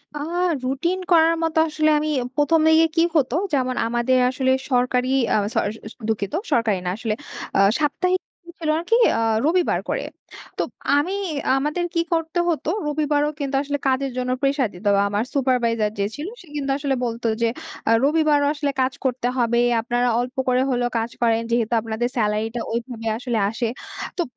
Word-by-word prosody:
আ -, -, -4 dB, 0.4 s
routine 305 Hz, +9 st, -1 dB
করার 330 Hz, -1 st, +5 dB
মতো 320 Hz, -1 st, +1 dB
আসলে 310 Hz, 0 st, +1 dB
আমি 305 Hz, +1 st, -2 dB, 0.3 s
১ম 310 Hz, +2 st, +3 dB
দিকে 320 Hz, +1 st, +6 dB
কি 330 Hz, -, +4 dB
হতো? 270 Hz, -3 st, +2 dB, 0.2 s
যেমন 255 Hz, -2 st, +1 dB
আমাদের 240 Hz, +2 st, +1 dB
আসলে 260 Hz, 0 st, 0 dB, 0.2 s
সরকারি 250 Hz, 0 st, +2 dB, 0.3 s
আ -, -, +4 dB, 0.2 s
সরি 205 Hz, -, 0 dB
আ 225 Hz, +2 st, -11 dB
দুঃখিত, 205 Hz, -1 st, -2 dB, 0.2 s
সরকারি 230 Hz, -7 st, +2 dB
না -, -, 0 dB
আসলে। 225 Hz, -2 st, -2 dB, 0.4 s
আ -, -, +3 dB, 0.2 s
সাপ্তাহিক 365 Hz, +5 st, +1 dB
ছুটি 345 Hz, -2 st, -16 dB
ছিল 320 Hz, -2 st, -2 dB
আরকি 345 Hz, +7 st, +1 dB, 0.2 s
আ -, -, 0 dB, 0.3 s
রবিবার 350 Hz, +3 st, +2 dB
করে। -, -, -1 dB, 0.5 s
তো -, -, 0 dB, 0.4 s
আমি 340 Hz, +7 st, 0 dB, 0.4 s
আমাদের 300 Hz, +6 st, -1 dB
কি 335 Hz, -, +1 dB
করতে 325 Hz, +1 st, -1 dB
হতো? 320 Hz, -2 st, -1 dB, 0.2 s
রবিবারও 295 Hz, 0 st, +1 dB
কিন্তু 280 Hz, -1 st, -2 dB
আসলে 285 Hz, 0 st, -2 dB
কাজের 265 Hz, +1 st, +1 dB
জন্য 250 Hz, 0 st, -1 dB
প্রেশার 275 Hz, -3 st, +1 dB
দিতো। 180 Hz, +4 st, -6 dB
আ -, -, +4 dB
আমার 205 Hz, +2 st, 0 dB
supervisor 240 Hz, -5 st, +1 dB
যে 200 Hz, -, +2 dB
ছিল 295 Hz, +4 st, -5 dB
সে 360 Hz, -, -17 dB
কিন্তু 275 Hz, -2 st, -1 dB
আসলে 280 Hz, -2 st, -1 dB
বলতো 235 Hz, 0 st, -3 dB
যে 230 Hz, -, +3 dB, 0.4 s
আ -, -, +4 dB
রবিবারও 300 Hz, 0 st, +3 dB
আসলে 290 Hz, -2 st, -1 dB
কাজ 260 Hz, 0 st, +1 dB
করতে 250 Hz, -1 st, 0 dB
হবে। 235 Hz, -1 st, +2 dB, 0.2 s
আপনারা 245 Hz, +2 st, 0 dB
অল্প 250 Hz, +2 st, -3 dB
করে 255 Hz, 0 st, +3 dB
হলেও 245 Hz, -1 st, 0 dB
কাজ 225 Hz, +1 st, -2 dB
করেন। 230 Hz, -1 st, +3 dB
যেহেতু 235 Hz, -1 st, +1 dB
আপনাদের 225 Hz, +2 st, -2 dB
স্যালারিটা 220 Hz, +1 st, 0 dB
ওইভাবে 230 Hz, -1 st, -4 dB
আসলে 240 Hz, -1 st, -2 dB
আসে। 230 Hz, +2 st, -2 dB, 0.5 s
তো -, -, +1 dB
260 Hz, 175 wpm, -22 LUFS, 235-300 Hz, 0.5 s, দিকে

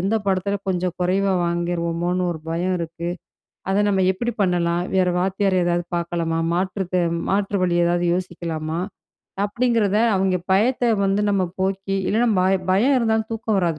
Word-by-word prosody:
எந்த 195 Hz, +5 st, 0 dB
பாடத்துல 195 Hz, +1 st, 0 dB
கொஞ்சம் 180 Hz, -1 st, -1 dB
குறைவா 190 Hz, +2 st, +1 dB
வாங்கிருவோமோன்னு 170 Hz, +1 st, -1 dB
1 160 Hz, -, -8 dB
பயம் 180 Hz, +3 st, 0 dB
இருக்கு? 170 Hz, 0 st, -5 dB, 0.6 s
அத 200 Hz, +2 st, +2 dB
நம்ம 190 Hz, -2 st, +2 dB
எப்படி 240 Hz, +5 st, -3 dB
பண்ணலாம்? 175 Hz, -2 st, +1 dB
வேற 185 Hz, -1 st, +3 dB
வாத்தியார் 190 Hz, +1 st, +1 dB
யாராவது 175 Hz, 0 st, 0 dB
பார்க்கலாமா? 170 Hz, -1 st, -1 dB
மாற்று 185 Hz, +1 st, -1 dB
தே 180 Hz, -, +3 dB, 0.3 s
மாற்று 200 Hz, 0 st, 0 dB
வழி 175 Hz, -1 st, +1 dB
ஏதாவது 175 Hz, 0 st, +1 dB
யோசிக்கலாமா? 170 Hz, -2 st, -3 dB, 0.7 s
அப்டிங்கிறத 220 Hz, -2 st, +1 dB, 0.2 s
அவங்க 190 Hz, -1 st, +1 dB, 0.2 s
பயத்த 235 Hz, +3 st, +2 dB
வந்து 195 Hz, +1 st, +1 dB
நம்ம 195 Hz, -2 st, +2 dB, 0.2 s
போக்கி, 195 Hz, +1 st, -1 dB
இல்லன்னா 230 Hz, +2 st, +2 dB
பயம் 185 Hz, 0 st, +1 dB
பயம் 250 Hz, +9 st, +3 dB
இருந்தா 225 Hz, -2 st, +2 dB, 0.2 s
தூக்கம் 220 Hz, -2 st, -1 dB
வராது 170 Hz, -4 st, 0 dB
185 Hz, 150 wpm, -22 LUFS, 175-200 Hz, 0.7 s, வேற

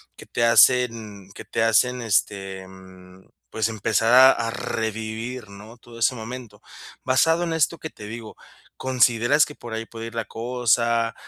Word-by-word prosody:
que -, -, -13 dB
te 115 Hz, -, -1 dB
hacen 115 Hz, -5 st, +2 dB
que -, -, -9 dB
te 115 Hz, -, -2 dB
hacen, 125 Hz, +3 st, +2 dB
este, 100 Hz, -3 st, -1 dB
em, 95 Hz, 0 st, -16 dB, 0.2 s
pues, 110 Hz, -1 st, -1 dB
empezar 110 Hz, +1 st, 0 dB
a 130 Hz, +1 st, +9 dB
a 115 Hz, -1 st, -2 dB
revivir, 110 Hz, +1 st, -5 dB
¿no?, 105 Hz, +3 st, -13 dB
todo 115 Hz, -1 st, -14 dB
ese 125 Hz, +3 st, +2 dB
momento. 120 Hz, +1 st, -9 dB, 0.4 s
Basado 160 Hz, +6 st, +2 dB
en 170 Hz, -, -2 dB
esto 160 Hz, +1 st, +1 dB
que 155 Hz, -, -7 dB
te 105 Hz, -, -11 dB
digo, 110 Hz, 0 st, -9 dB, 0.4 s
¿consideras 125 Hz, +2 st, +2 dB
que 150 Hz, -, -11 dB
por 120 Hz, -2 st, -10 dB
ahí 115 Hz, 0 st, -5 dB
puede 115 Hz, 0 st, -8 dB
ir 115 Hz, -, -11 dB
la 115 Hz, -, -2 dB
cosa, 115 Hz, 0 st, 0 dB
115 Hz, 165 wpm, -23 LUFS, 110-125 Hz, 0.4 s, a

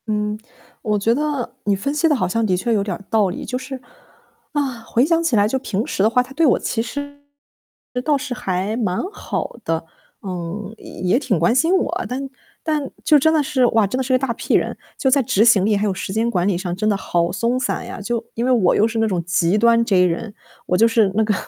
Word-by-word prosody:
嗯， 210 Hz, 0 st, -1 dB, 0.4 s
我 210 Hz, -2 st, 0 dB
觉 220 Hz, +3 st, +2 dB
得 290 Hz, -2 st, -2 dB
你 205 Hz, -1 st, +2 dB
分 280 Hz, +9 st, -2 dB
析 305 Hz, +2 st, +2 dB
得 300 Hz, -, +3 dB
好 185 Hz, -8 st, 0 dB
像 225 Hz, +5 st, 0 dB
的 185 Hz, -3 st, +1 dB
确 230 Hz, +6 st, 0 dB
有 205 Hz, -2 st, +1 dB
点 195 Hz, -3 st, -3 dB
儿 200 Hz, -, -12 dB
道 215 Hz, -4 st, +3 dB
理， 180 Hz, -, -6 dB
就 250 Hz, -, -3 dB
是， 260 Hz, +1 st, -7 dB, 0.7 s
啊， 270 Hz, -5 st, -2 dB
回 235 Hz, +2 st, +1 dB
想 335 Hz, +1 st, +2 dB
起 330 Hz, -8 st, +1 dB
来 205 Hz, -1 st, +4 dB
就 265 Hz, +4 st, -1 dB
平 215 Hz, -3 st, -2 dB
时 -, -, -2 dB
的 215 Hz, -, +5 dB
话， 250 Hz, +2 st, +2 dB
他 265 Hz, -, -13 dB
对 320 Hz, +4 st, +2 dB
我 275 Hz, -, +4 dB
其 225 Hz, -, -1 dB
实 285 Hz, +4 st, -6 dB, 0.8 s
倒 295 Hz, 0 st, +2 dB
是 275 Hz, -1 st, -4 dB
还 195 Hz, -3 st, -2 dB
蛮 200 Hz, -6 st, -1 dB
好 415 Hz, -, -5 dB
的， 165 Hz, 0 st, -2 dB, 0.4 s
嗯， 185 Hz, +2 st, -5 dB, 0.3 s
也 185 Hz, +7 st, +3 dB
挺 250 Hz, -9 st, 0 dB
关 170 Hz, +7 st, +3 dB
心 325 Hz, +8 st, +3 dB
我。 -, -, -2 dB
但 270 Hz, +2 st, -4 dB, 0.3 s
但 300 Hz, -4 st, -1 dB
就 300 Hz, -, +5 dB
真 315 Hz, +3 st, +3 dB
的 310 Hz, -2 st, +3 dB
是 260 Hz, -2 st, +2 dB
哇， 225 Hz, -2 st, +3 dB
真 200 Hz, +6 st, -2 dB
的 265 Hz, -, 0 dB
是 260 Hz, +1 st, -1 dB
一 -, -, +5 dB
大 255 Hz, -2 st, -1 dB
P -, -, -1 dB
人。 -, -, +1 dB, 0.2 s
就 265 Hz, -, +1 dB
在 275 Hz, +1 st, +4 dB
执 220 Hz, -3 st, +2 dB
行 210 Hz, -5 st, +5 dB
力 210 Hz, -1 st, +2 dB
还 205 Hz, -, 0 dB
有 200 Hz, -, +1 dB
时 190 Hz, -, -5 dB
间 225 Hz, +4 st, 0 dB
管 180 Hz, -3 st, +1 dB
理 195 Hz, -4 st, +1 dB
上 175 Hz, -1 st, -3 dB
真 215 Hz, +3 st, 0 dB
的 200 Hz, -, +1 dB
好 170 Hz, -2 st, 0 dB
松 235 Hz, +6 st, 0 dB
散 245 Hz, -, -2 dB
呀， 240 Hz, -, -7 dB
就 235 Hz, +2 st, -2 dB
因 235 Hz, -, -2 dB
为 255 Hz, -, +2 dB
我 220 Hz, -8 st, +3 dB
又 215 Hz, -, +4 dB
是 230 Hz, 0 st, -4 dB
那 225 Hz, -, +2 dB
种 180 Hz, -5 st, -1 dB
极 175 Hz, +2 st, +1 dB
端 230 Hz, +1 st, +4 dB
J 185 Hz, -4 st, +4 dB
人， 180 Hz, +5 st, -2 dB, 0.3 s
我 180 Hz, -, +1 dB
就 225 Hz, -, +5 dB
是 225 Hz, -4 st, +3 dB
那 220 Hz, -, +3 dB
个 215 Hz, -1 st, +1 dB
225 Hz, 265 characters per minute, -20 LUFS, 195-260 Hz, 0.8 s, 的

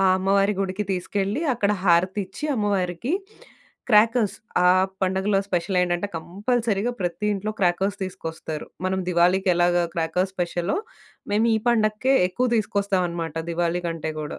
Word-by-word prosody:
ఆ! -, -, +3 dB
అమ్మవారి 195 Hz, +2 st, +2 dB
గుడికి 195 Hz, +1 st, -2 dB
తీసుకెళ్లి 195 Hz, -, -2 dB
అక్కడ 210 Hz, -3 st, +1 dB
హారతిచ్చి 190 Hz, -, +1 dB
అమ్మవారికి 200 Hz, -, -1 dB, 0.8 s
క్రాకర్స్ 220 Hz, 0 st, +4 dB, 0.3 s
ఆ -, -, +7 dB, 0.3 s
పండగలో 190 Hz, +2 st, +1 dB
స్పెషలేంటంటే 180 Hz, +1 st, 0 dB
కంపల్సరీగా 215 Hz, +5 st, -1 dB
ప్రతి 175 Hz, +2 st, -2 dB
ఇంట్లో 205 Hz, +2 st, -3 dB
క్రాకర్స్ 190 Hz, +2 st, +1 dB
తీసుకొస్తారు. 160 Hz, -4 st, -6 dB, 0.2 s
మనం 190 Hz, 0 st, 0 dB
దివాళీకెలాగా 175 Hz, 0 st, +3 dB
క్రాకర్స్ 170 Hz, +3 st, -1 dB
స్పెషలో, 175 Hz, 0 st, -1 dB, 0.6 s
మేము 215 Hz, +3 st, +3 dB
ఈ -, -, +2 dB
పండగకే 225 Hz, +3 st, +2 dB
ఎక్కువ 250 Hz, +8 st, 0 dB
తీసుకొస్తామన్నమాట 185 Hz, -6 st, -1 dB, 0.2 s
దివాళీ 170 Hz, +1 st, -1 dB
కంటే 160 Hz, -1 st, -4 dB
గూడా. 150 Hz, -, -6 dB
190 Hz, 115 wpm, -24 LUFS, 175-205 Hz, 0.8 s, ఆ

